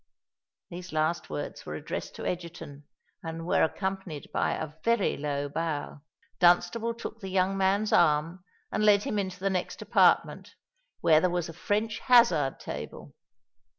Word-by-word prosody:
These 180 +1 -8
last 155 +2 0
words 75 -1 -5
were - - -6
addressed - - -6
to - - -7
Egerton, 165 -5 -6 0.4
and 165 0 -6
were - - +2
accompanied 190 -3 -3
by - - +1
a 155 -1 -5
very 230 -4 +2
low 145 0 -2
bow. 150 -1 -4 0.4
Dunstable 180 +6 +3
took 225 -1 -7
the 195 -3 -7
young 190 +1 +1
man's 195 +2 +1
arm, 165 +2 +2 0.3
and 215 - 0
led 205 -1 +5
him 210 - -1
into 185 -2 -4
the 195 +1 0
next 185 -1 -3
apartment, - - +2 0.5
where 155 -1 +5
there 185 - +2
was 175 -1 -2
a - - -7
French 210 +4 -1
hazard 180 - +4
table. - - -8
180 Hz, 150 wpm, -28 LUFS, 160-195 Hz, 0.5 s, led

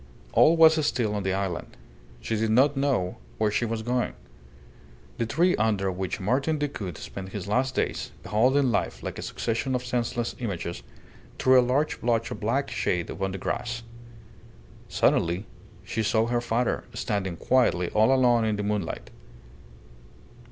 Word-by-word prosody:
All 165 +2 +6
was 160 -1 +6
still 115 -7 0
on 105 - -1
the 95 0 0
island; 95 -3 -4 0.4
she 115 - -2
did 110 +1 0
not 135 +6 +4
know 135 -10 0 0.2
where 105 -1 +1
she 120 - 0
was 115 -1 -3
going. 125 - 0 1.1
The 115 - 0
tree 175 +9 +3
under 100 -3 +1
which 95 +3 -3
Martin 135 +10 +1
Decoud 110 - -4
spent 95 -1 -8
his 100 -2 -5
last 130 +5 0
days, - - -1
beholding 130 +4 +3
life - - -1
like - - -5
a - - -4
succession 120 +3 -2
of 125 0 -2
senseless 120 -1 -2
images, 95 -7 -4 0.6
threw 130 0 +5
a - - +6
large 130 +5 0
blotch 115 -1 0
of - - -5
black 130 +6 -1
shade 90 -7 -1
upon 95 0 -3
the 95 - -4
grass. 115 +5 -3 1.1
Suddenly 85 +5 +1 0.4
she 110 +4 -2
saw 110 +1 +2
her 120 0 0
father, 120 +1 0
standing 95 -4 -2
quietly 115 -9 +2
all 110 +4 +4
alone 125 -3 +4
in 110 -1 +1
the 105 - -3
moonlight. 100 -12 -3
115 Hz, 160 wpm, -26 LUFS, 100-125 Hz, 1.1 s, All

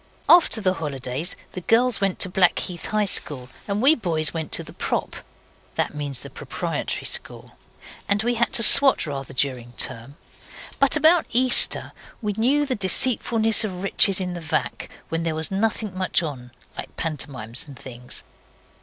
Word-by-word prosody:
After 340 -10 +5
the 185 -2 +1
holidays 145 -1 -3 0.2
the 185 - -8
girls 230 +3 +1
went 195 -2 -1
to - - +2
the - - -12
Blackheath 180 -1 0
High 215 -1 -1
School, 130 -9 0 0.2
and 205 +3 -2
we 285 +4 +7
boys 165 - 0
went 160 -2 -6
to - - +1
the - - -14
Prop. - - -4 0.6
(that - - -2
means 145 -3 -6
the - - -11
Proprietary - - -5
School). - - -2 0.6
And 205 +2 +1
we 240 +1 0
had 235 0 0
to 230 - +5
swot 270 +1 +6
rather 135 -2 -7
during 125 -3 -3
term; 120 +3 -2 0.6
but 275 +1 +3
about 315 +3 +3
Easter 250 +1 +4 0.3
we 210 -3 -3
knew 265 +8 0
the 270 - -3
deceitfulness 225 +1 +3
of 185 -3 -6
riches 195 0 +4
in 180 -1 -4
the 175 - -7
vac., 155 - -4 0.2
when 165 0 -3
there 165 -1 -3
was 160 +1 -1
nothing 210 0 -2
much 185 -1 0
on, 130 -6 -7 0.3
like - - -9
pantomimes 135 -6 -2
and 140 -3 -13
things. 125 -1 -5
185 Hz, 170 wpm, -22 LUFS, 145-225 Hz, 0.6 s, we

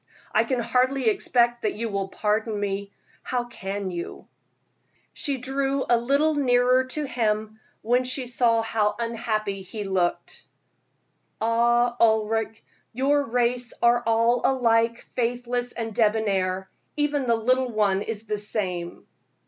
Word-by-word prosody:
I - - +3
can 260 -3 -1
hardly 250 +1 +2
expect 240 +2 +1
that 215 - -1
you 230 +1 -3
will 200 -1 -2
pardon 210 +2 -1
me. 200 0 -3 0.3
How 250 -1 -2
can 195 -4 -5
you?" 170 -1 -7 0.9
She 280 -3 -1
drew 270 +1 -1
a 240 - +5
little 280 +6 +2
nearer 255 -2 +3
to 295 +3 -3
him 220 -3 -1 0.2
when 245 +3 +2
she 255 +1 -3
saw 235 -2 +2
how 215 -2 0
unhappy 220 -4 -2
he 210 +3 -6
looked. 185 -3 -1 1.0
"Ah, 235 +1 +2
Ulric," 220 -1 +3
she 225 - -24
said, - - -27 0.3
"your 280 +4 +2
race 245 0 0
are 240 0 +5
all 230 +1 +2
alike 230 -3 +2
faithless 245 0 -1
and 225 -2 -5
debonair; 200 -4 +1 0.3
even 295 -3 0
the 235 - +4
little 255 +3 +1
one 205 -4 +1
is 220 0 -4
the 210 -1 -2
same." 185 -5 -4
230 Hz, 140 wpm, -25 LUFS, 215-250 Hz, 1.0 s, a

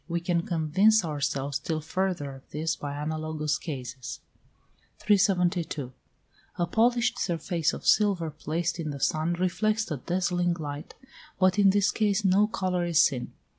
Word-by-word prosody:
We 170 0 -1
can 170 0 0
convince 185 +6 +3
ourselves 140 -2 -2
still 155 +2 -3
further 160 -3 -2
of 135 0 -15
this 160 +1 -2
by 145 -2 -5
analogous 155 0 -2
cases. 130 -5 -6 0.8
372. 180 - +1 0.6
A 175 - 0
polished 240 +5 +2
surface 170 -2 0
of - - -8
silver 195 -7 +3
placed 160 +3 -3
in 155 -2 -3
the 140 -1 -5
sun 155 +4 +1
reflects 195 +4 0
a 150 - -1
dazzling 175 +3 0
light, 145 -2 -7 0.4
but 185 +1 +3
in 200 -1 +6
this 200 0 +3
case 210 -1 +1
no 195 +3 +4
colour 185 -4 -1
is 170 -2 +2
seen. 135 -7 +2
170 Hz, 145 wpm, -27 LUFS, 150-190 Hz, 0.8 s, in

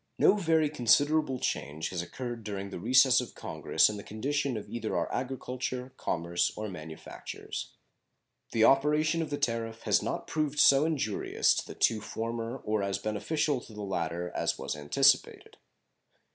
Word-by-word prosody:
No 195 - +5
very 160 -5 +2
considerable 145 +2 +3
change 80 - -3
has 90 -2 -3
occurred 120 +5 -6
during 100 -2 -5
the - - -6
recess 130 +5 +5
of 125 - -9
Congress - - +2
in 105 - -3
the 100 - -8
condition 135 +3 -2
of 105 - -7
either 115 -2 -3
our - - 0
agriculture, 130 0 -4
commerce, 85 0 -1
or 110 0 -4
manufactures. 80 -3 -8 0.8
The 110 - +2
operation 150 +5 +4
of 160 - -3
the 145 - -2
tariff 115 -2 -2
has - - +3
not - - -3
proved 150 -2 -2
so 140 0 +6
injurious 140 -10 +1
to - - -3
the - - -8
two 110 -2 +2
former 115 +3 -4
or 105 -1 0
as 100 -1 -1
beneficial 130 +7 -1
to 110 - -13
the 105 0 -6
latter 85 -2 -3
as - - -1
was - - -4
anticipated. 130 - +2
120 Hz, 160 wpm, -29 LUFS, 105-140 Hz, 0.8 s, so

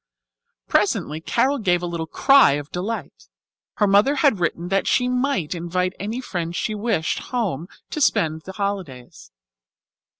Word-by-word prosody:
Presently 155 +2 +1
Carol 275 - +1
gave 180 -5 +1
a - - 0
little 170 -2 -4
cry 275 - +5
of 145 0 -5
delight. 180 - -5 0.5
Her 210 - +2
mother 205 +8 +4
had 270 - +3
written 175 0 -2
that 195 0 +1
she 250 - +2
might 250 - 0
invite 180 +2 -2
any 220 +6 -4
friend 175 -7 -4
she 215 - -2
wished 210 -6 -1
home 215 - -1
with - - -21
her - - -20 0.2
to 305 - -3
spend 160 - +2
the 190 +4 -9
holidays. 190 - -5
190 Hz, 160 wpm, -22 LUFS, 165-230 Hz, 0.5 s, cry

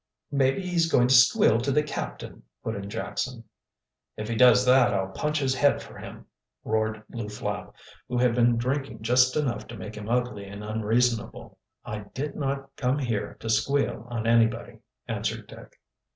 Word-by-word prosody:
"Maybe 140 +5 +1
he's 170 -2 +1
going 125 -1 +4
to - - +5
squeal 120 -2 +6
to 125 +4 -1
the 150 +2 +3
captain," 150 - -6 0.2
put - - -2
in 100 0 -6
Jackson. 120 +3 -4 0.7
"If 110 +1 -5
he 115 - -1
does 125 +1 +6
that 125 -3 +5
I'll 95 -1 -1
punch 150 +9 -1
his 135 -3 +1
head 145 +1 +3
for - - -11
him!" - - -10 0.4
roared 110 0 -1
Lew 115 -3 -5
Flapp, 105 - -5 0.3
who 125 -1 -2
had 125 -1 +3
been 120 0 +3
drinking 130 -2 -2
just 125 +2 +4
enough 145 -6 -1
to 120 - -9
make 105 0 -7
him 105 0 -7
ugly 120 -4 -1
and 100 +1 -8
unreasonable. 110 +2 -1 0.3
"I 105 - -4 0.2
did 145 +2 -3
not 135 -1 -3
come 130 +1 +1
here 115 -7 -3
to - - -6
squeal 120 +1 0
on 115 -2 -3
anybody," 115 0 +2 0.3
answered - - -3
Dick. - - -14
120 Hz, 175 wpm, -26 LUFS, 110-135 Hz, 0.7 s, squeal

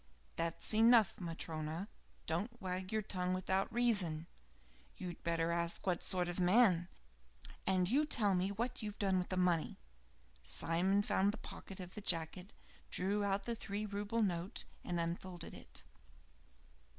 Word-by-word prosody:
"That's 165 +5 -1
enough, 225 -1 +6
Matryona. 165 +1 -3 0.4
Don't 205 +9 -2
wag 185 -1 -4
your 220 -1 0
tongue 185 -2 -1
without 190 +1 0
reason. 195 -10 +2 0.7
You 180 - -4
had 175 - -9
better 165 0 +1
ask 170 0 -1
what 180 -3 +1
sort 180 -2 0
of 175 +1 -3
man 180 -2 +5 0.4
" 60 0 -17
"And 185 -1 +3
you 285 +8 +3
tell 210 -9 +4
me 185 +1 +1
what 235 +5 -2
you've 210 -1 -5
done 190 -2 +2
with 180 - -3
the 185 - -1
money?" 175 -3 +2 0.6
Simon 185 - +2
found 200 0 +3
the 215 - -7
pocket 195 - -9
of 180 -1 -8
the 210 - -6
jacket, 180 +2 -1 0.3
drew 200 +3 +1
out 200 0 +1
the 235 - -1
three 210 -2 -3
rouble 205 +2 -1
note, 180 -1 -1 0.2
and 175 -1 -2
unfolded 170 +1 -4
it. - - -7
185 Hz, 155 wpm, -36 LUFS, 170-205 Hz, 0.7 s, enough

